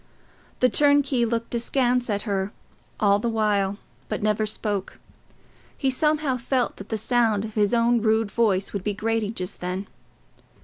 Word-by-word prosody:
The 255 - +6
turnkey 285 -4 +3
looked 230 0 -2
askance 245 +1 +1
at 205 -1 -1
her 195 -2 -2 0.5
all 200 -1 +4
the 235 - -1
while, 205 -3 +1 0.3
but - - -3
never 215 0 +1
spoke. 210 -2 -3 0.8
He 270 -2 +1
somehow 300 -1 +1
felt 250 +1 -1
that 200 - -10
the 220 - -1
sound 225 -3 +2
of 220 - -8
his 205 -2 +2
own 235 0 +3
rude 220 -1 +1
voice 200 -5 +1
would 200 -3 -3
be 210 0 -2
grating 225 0 -1
just 180 0 -5
then. 180 +2 -3
220 Hz, 160 wpm, -24 LUFS, 205-240 Hz, 0.8 s, The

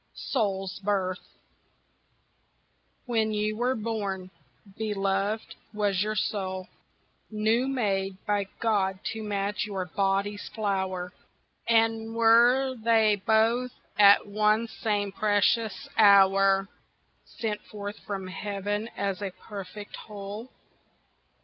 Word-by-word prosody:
Soul's 195 -6 -1
Birth 190 -2 -2 1.7
When 225 -3 +1
you 210 0 -1
were 250 +3 0
born, 200 -4 -3 0.4
beloved, 200 0 -1 0.2
was 200 -3 +1
your 215 +1 -1
soul 190 -2 -2 0.6
New 220 +4 +1
made 195 -7 -1
by 205 -1 0
God 195 -4 +1 0.2
to 220 - -6
match 205 0 -2
your 195 -3 -3
body's 195 +3 -1
flower, 190 -4 -2 0.6
And 225 0 +2
were 240 +4 +5
they 220 -3 +3
both 230 +3 +3 0.2
at 200 -1 +7
one 215 +2 +2
same 205 -3 -2
precious 210 +2 +1
hour 195 -1 +5 0.6
Sent 210 -2 -4
forth 205 0 -7
from 195 -3 -5
heaven 205 +2 -3
as 200 -1 -2
a 200 - -2
perfect 200 +1 -9
whole? 210 +3 -8
205 Hz, 100 wpm, -27 LUFS, 195-220 Hz, 1.7 s, at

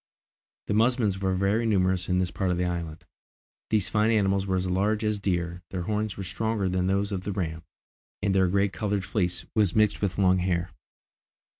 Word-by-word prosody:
The - - -1
musmons 110 -3 +2
were 95 -1 +1
very 100 +5 +1
numerous 95 -3 +1
in 90 - +2
this 90 -1 0
part 95 - -1
of 90 - 0
the 90 - 0
island. 85 -3 -4 0.6
These 105 -3 +2
fine 105 +3 +2
animals 100 -3 +2
were 95 - 0
as 95 0 0
large 100 +4 +1
as 105 -1 0
deer; 90 -3 -2
their 90 -2 -4
horns 105 +1 -2
were 100 - -4
stronger 110 +1 -1
than 90 0 0
those 100 +2 0
of 95 -2 -2
the 100 - -3
ram, 80 -5 -3 0.6
and 100 -1 0
their 95 -1 +3
grey 100 +2 +2
coloured 100 -1 -2
fleece 90 -3 -1
was 105 -5 +2
mixed 105 -1 +2
with 100 -3 -1
long 95 -1 +4
hair. 90 -1 -1
95 Hz, 195 wpm, -27 LUFS, 90-105 Hz, 0.6 s, long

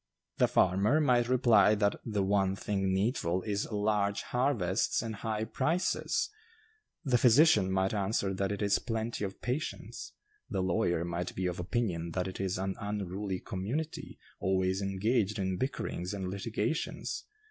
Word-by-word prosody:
The - - +4
farmer 100 - +3
might 125 -5 +3
reply, 120 -4 +5
that 100 -1 0
'the 105 -3 -1
one 95 -1 +2
thing 95 -2 -1
needful 95 -3 0
is 105 +1 -2
large 105 -1 0
harvests 120 -8 +1
and 110 -2 -5
high 110 0 -2
prices.' 165 - 0 0.7
The 125 -3 +3
physician 120 - +5
might 95 +1 +1
answer 100 -1 0
that 95 +1 -1
'it 100 0 -2
is 100 0 +3
plenty 115 -2 -3
of 95 -1 -5
patients.' 135 +6 -4 0.4
The 95 - -1
lawyer 85 -2 +1
might 85 +1 -3
be 95 - -2
of 90 -1 -2
opinion 90 -4 -2
that 90 +1 -1
'it 95 - -7
is 95 -1 -1
an 95 0 -2
unruly 100 -2 -3
community, 125 +13 -4 0.2
always 95 0 +1
engaged 105 +2 0
in 95 -2 -1
bickerings 100 -7 -3
and 95 -2 -3
litigations. 110 +8 -3
100 Hz, 145 wpm, -31 LUFS, 95-115 Hz, 0.7 s, reply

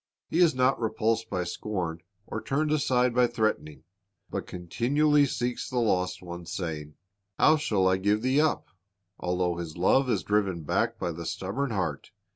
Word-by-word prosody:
"^ - - -66 0.3
He 165 - +1
is 170 -5 +5
not 130 0 +2
repulsed 110 0 0
by 90 -2 -1
scorn 85 -2 -4 0.2
or 110 - -5
turned 150 +3 0
aside 125 -5 +2
by 125 0 +4
threatening, 110 -10 -2 0.5
but - - -4
continually 140 - +2
seeks 125 -1 -3
the 130 - -3
lost 90 -6 0
ones, 85 -1 -8
saying, 75 -4 -4 0.4
"How 155 - +5
shall 105 -10 +1
I 95 0 +3
give 105 +3 +1
thee 130 +3 +3
up?"* 155 -1 +1 0.5
Although 90 -1 0
His 85 -1 -6
love 130 +9 +3
is - - +1
driven 100 -5 0
back - - 0
by 85 - -2
the 85 0 -6
stubborn 110 +9 -2
heart. 90 - -3
105 Hz, 170 wpm, -28 LUFS, 90-125 Hz, 0.5 s, is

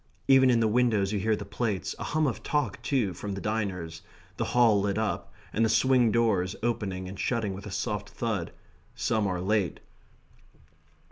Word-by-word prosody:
Even 135 -1 +6
in 120 -2 +4
the 115 - +3
window 110 -3 +2
you 100 +1 -2
hear 110 +2 +1
the 100 - -7
plates; 100 -3 -2
a - - -4
hum 155 0 +1
of 130 - -2
talk, 145 -9 -1
too, 120 -10 0
from 100 +3 -5
the - - -4
diners; 95 -7 -3 0.4
the - - -1
Hall 115 -5 +4
lit 100 0 -1
up, 110 -1 -2 0.2
and 115 - +2
the 110 - +3
swing 120 +1 +4
doors 105 -6 +1
opening 100 -6 -2
and 95 +1 -8
shutting 110 -5 -1
with 100 +2 -8
a - - -7
soft 105 +1 -3
thud. 105 -8 -3 0.4
Some 110 -2 0
are 90 -2 -2
late. 100 0 0
105 Hz, 185 wpm, -28 LUFS, 95-115 Hz, 0.4 s, Even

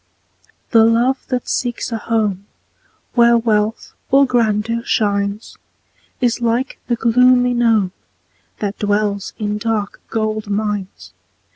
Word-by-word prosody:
The 225 -2 +6
love 235 +4 +2
that 250 -2 -3
seeks 245 -1 -2
a 225 - -1
home 210 -4 -1 0.7
Where 235 -1 +5
wealth 220 -1 -1 0.2
or 275 +1 +5
grandeur 230 -2 0
shines, 200 -1 -1 0.6
Is 245 -1 0
like 235 +3 -1
the 240 - +1
gloomy 250 +2 +3
gnome, 225 -6 +2 0.7
That 205 -1 -4
dwells 205 -1 -1
in 210 -1 -2
dark 215 -2 -2
gold 215 -1 -2
mines. 205 -2 -3
225 Hz, 115 wpm, -18 LUFS, 210-240 Hz, 0.7 s, The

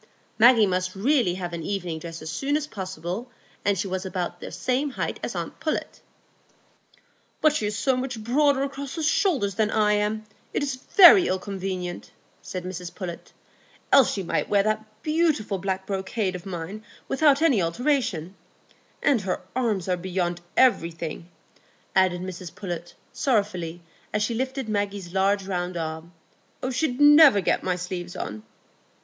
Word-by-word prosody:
Maggie 230 -1 +7
must 185 0 -1
really 230 -3 +2
have 175 -2 -5
an 170 - -4
evening 175 -2 -3
dress 165 -1 -8
as 155 - -5
soon 280 - 0
as 300 - -3
possible, 190 - -5 0.3
and 200 -1 +2
she 195 +3 -2
was 185 0 -3
about 185 -2 -4
the - - -8
same 260 +3 -1
height 265 - -3
as - - -4
aunt - - -5
Pullet. - - -3 1.4
"But 310 -1 +4
she's 210 -6 -1
so 265 -2 +2
much 250 -3 -4
broader 275 +3 +3
across 275 -1 -5
the 325 - -3
shoulders 300 - +2
than 215 +2 +1
I 210 -1 +3
am, 210 +1 0 0.3
it's 285 -2 -1
very 355 +7 +7
ill 185 - +1
convenient," 185 -2 -5 0.3
said 185 -1 -6
Mrs 180 -1 -6
Pullet, 175 -4 -7 0.6
"else 275 -3 +6
she 195 - -3
might 170 - -1
wear 200 -1 +4
that 215 0 -3
beautiful 305 - +1
black 190 0 -2
brocade 190 0 -2
o' 180 +2 -7
mine 185 +5 -6 0.2
without 285 +1 +3
any 270 - +4
alteration; 185 - 0 0.7
and 260 -6 +3
her 185 -1 -3
arms 220 -8 0
are 180 -1 +1
beyond 175 -1 -2 0.2
everything," 170 -8 +1 0.7
added 185 -2 +3
Mrs 180 -2 -7
Pullet, 175 -3 -6 0.2
sorrowfully, 200 -10 -1 0.3
as 210 0 0
she 235 - -1
lifted 260 +1 -3
Maggie's 205 -4 -2
large 195 +1 +2
round 180 -2 -3
arm, 160 +1 -5 0.6
"She'd 255 0 -1
never 290 -6 +8
get 190 - +1
my 180 -1 0
sleeves 180 0 -5
on." 105 - -5
200 Hz, 155 wpm, -25 LUFS, 180-255 Hz, 1.4 s, never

